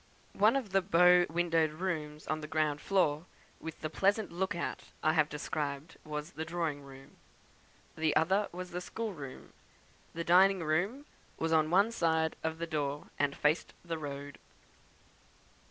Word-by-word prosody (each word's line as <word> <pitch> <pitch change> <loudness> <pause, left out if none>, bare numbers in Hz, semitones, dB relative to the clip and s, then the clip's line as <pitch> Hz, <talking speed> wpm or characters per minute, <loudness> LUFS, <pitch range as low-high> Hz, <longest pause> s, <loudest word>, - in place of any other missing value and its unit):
One 215 +5 +4
of 250 -8 -2
the 195 0 +3
bow 180 -1 +5
windowed 165 -1 +2
rooms 155 -3 -4
on 155 0 -2
the 155 - -6
ground 155 -2 0
floor 175 -4 +1 0.3
with 160 0 -8
the 155 - -2
pleasant 200 +4 +1
look 190 +2 -1
out 170 - -4 0.2
I 155 - +4
have 155 -2 +3
described 150 +1 -4
was 150 +1 -5
the 160 - -5
drawing 160 -3 -2
room; 135 -1 -14 0.8
the 160 -1 +1
other 190 +6 +2
was 180 0 -7
the 180 +1 -4
schoolroom. 180 - -6 0.6
The 170 - -2
dining 185 +1 +5
room 185 - 0 0.3
was 165 0 0
on 155 -1 +3
one 200 +6 +4
side 160 -5 +1
of 160 0 -2
the 170 - -3
door, 145 -3 -3
and 145 -1 +1
faced 150 +2 +1
the 165 -2 -3
road. 140 -1 -7
160 Hz, 155 wpm, -32 LUFS, 150-180 Hz, 0.8 s, bow